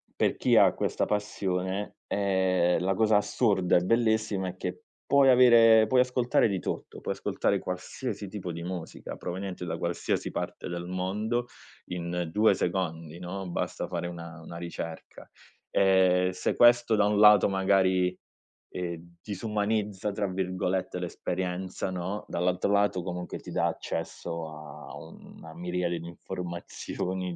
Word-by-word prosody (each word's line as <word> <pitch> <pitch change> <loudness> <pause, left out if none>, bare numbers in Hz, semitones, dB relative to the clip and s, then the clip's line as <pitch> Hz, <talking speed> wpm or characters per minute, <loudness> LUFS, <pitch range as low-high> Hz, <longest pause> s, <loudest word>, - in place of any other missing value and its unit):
per - - +1
chi - - +3
ha - - +6
questa - - -1
passione, 100 -1 -2
ehm, 95 -3 +2
la 95 +2 +1
cosa 110 0 +4
assurda 105 -2 +2
e - - +2
bellissima 110 -2 +1
è 90 - -8
che 90 0 -5 0.2
puoi 140 -1 +5
avere 115 -3 +7
puoi 130 -1 +3
ascoltare 125 -2 +2
di 95 -3 -1
tutto, - - -5
puoi - - -2
ascoltare - - 0
qualsiasi 100 +4 -5
tipo 95 -3 -5
di 85 +1 -6
musica 90 -2 -6
proveniente 90 0 -5
da 80 - -3
qualsiasi 85 0 -2
parte - - -5
del 85 0 -4
mondo 105 +7 -2 0.4
in 90 -1 -3
2 110 +5 +4
secondi, 85 -3 -2
no, 90 +1 -5
basta - - -3
fare 85 - -3
una 85 -1 -8
una 85 - -10
ricerca. 85 -1 -7 0.4
Ehm, 95 -1 +4
se 90 0 -2
questo 120 -1 +5
da 105 -1 +3
un 105 0 +1
lato 105 -1 +7
magari, 95 -1 +2 0.6
ehm, 85 -1 -6
"disumanizza" 105 -1 -2
tra 100 0 -1
virgolette 95 0 -2
l'esperienza, 90 +1 -3
no, 95 +3 -4
dall'altro 90 +2 0
lato 100 -2 +2
comunque 90 0 -5
ti - - -11
dà - - +1
accesso 85 -1 -4
a 75 -1 -10
una 80 -1 -12
miriade 90 0 -2
di 85 - -8
informazioni 90 +1 -5
95 Hz, 140 wpm, -28 LUFS, 90-105 Hz, 0.6 s, avere